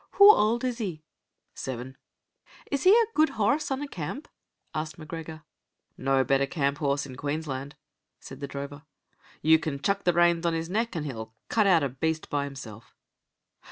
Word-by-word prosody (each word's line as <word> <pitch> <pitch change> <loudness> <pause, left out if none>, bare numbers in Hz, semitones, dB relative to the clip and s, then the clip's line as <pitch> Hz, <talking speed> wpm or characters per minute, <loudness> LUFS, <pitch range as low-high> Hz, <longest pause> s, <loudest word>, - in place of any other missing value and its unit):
"Hoo 405 +1 +10
auld 230 - +2
is 250 -2 -2
he?" 175 -8 -4 0.5
"Seven." 130 0 -6 0.8
"Is 280 +2 -1
he - - +8
a 460 +2 +6
guid 310 +1 +3
horrse 280 +9 +1
on 270 +1 -2
a - - -4
camp?" 190 - -6 0.5
asked 155 0 -4
M'Gregor. 160 0 -8 0.5
"No 135 0 +2
better 135 +2 +2
camp 140 -1 -1
horse 140 -1 0
in 130 -2 -9
Queensland," 145 -1 -4 0.4
said - - -11
the 140 - -4
drover. 140 +1 -7 0.6
"You 160 +1 +6
can 155 -4 -3
chuck 200 +7 0
the 175 - +3
reins 170 0 +3
on 170 -1 +1
his 165 +1 -3
neck, 225 +1 -1
an' 160 - -2
he'll 110 -6 -6
cut 215 -3 +3
out 170 -5 +5
a 140 - 0
beast 160 +5 -2
by 145 -1 0
himself." 120 -6 -10
155 Hz, 175 wpm, -27 LUFS, 140-200 Hz, 0.8 s, Hoo